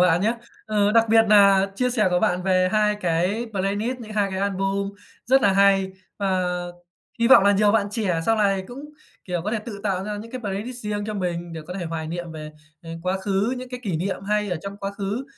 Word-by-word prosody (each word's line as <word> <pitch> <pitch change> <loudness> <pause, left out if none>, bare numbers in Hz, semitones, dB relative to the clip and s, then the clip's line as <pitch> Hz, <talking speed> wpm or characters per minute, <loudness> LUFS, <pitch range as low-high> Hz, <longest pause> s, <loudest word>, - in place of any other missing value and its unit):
bạn 175 -1 +4
nhá. 225 +4 +1 0.3
Ờ, 210 -1 +2
đặc 230 -1 +5
biệt 225 0 +6
nà 200 -2 +6
chia 250 +3 0
sẻ 215 -6 +2
của 180 0 +2
bạn 180 0 +1
về 185 -1 +2
2 210 -1 +3
cái 180 +7 0
playlist, 205 +6 -2
những 215 -2 -9
2 205 -2 0
cái 190 0 -3
album 195 0 -1 0.4
rất 265 +2 +4
là 200 - +4
hay. 195 -1 +3 0.3
Và 190 -2 0 0.7
hy 235 +1 +2
vọng 200 - +8
là 200 - +5
nhiều 205 +1 +3
bạn 210 -3 +2
trẻ 195 -7 -1
sau 225 0 +3
này 195 -2 +1
cũng, 245 +2 -9 0.5
kiểu, 175 -3 -3
có 210 - -2
thể 220 - -1
tự 205 -3 -7
tạo 190 -2 -1
ra 210 0 -4
những 225 +2 -9
cái 255 - -6
playlist 215 +4 -4
riêng 210 -2 -3
cho 215 - -4
mình 175 -3 -3
để 160 - -6
có 180 - -7
thể 175 - -4
hoài 160 -1 -4
niệm 170 0 -5
về, 155 -1 -8 0.3
ờ, 165 - -9
quá 185 +1 -1
khứ, 200 +5 0
những 255 0 -7
cái 250 0 -7
kỷ 185 -7 -2
niệm 190 +3 -3
hay 210 0 0
ở 175 - -1
trong 200 0 -6
quá 195 0 -4
khứ, 200 +6 -4
200 Hz, 240 wpm, -23 LUFS, 185-215 Hz, 0.7 s, vọng